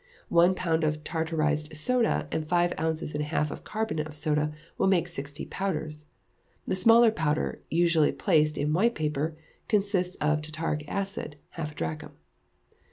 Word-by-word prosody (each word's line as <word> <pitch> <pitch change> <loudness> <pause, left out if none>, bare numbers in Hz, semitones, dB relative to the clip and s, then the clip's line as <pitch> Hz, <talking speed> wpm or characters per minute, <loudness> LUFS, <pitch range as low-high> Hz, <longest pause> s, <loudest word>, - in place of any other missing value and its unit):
One 175 +2 +5
pound 165 -3 0
of 155 0 0
tartarized 155 -1 -1
soda, 240 +9 +1
and 155 -1 -2
five 175 0 +3
ounces 160 -1 -1
and 150 - -1
a 150 - -2
half 150 -1 0
of - - -8
carbonate 215 -8 -2
of 150 - -11
soda, 150 0 0 0.2
will - - +1
make 180 -3 +3
sixty 145 -3 -6
powders. 155 -5 -4 0.6
The - - -1
smaller 230 +4 +6
powder, 160 -6 -1
usually 165 -2 +3
placed 155 -5 +2
in 150 +1 0
white 230 +8 +3
paper, 155 +1 -2 0.3
consists 195 -4 +1
of 150 0 +1
tartaric 155 0 -3
acid, 195 -6 -3 0.2
half 150 -2 -5
a - - -25
drachm. 80 -1 -4
160 Hz, 160 wpm, -28 LUFS, 150-180 Hz, 0.6 s, smaller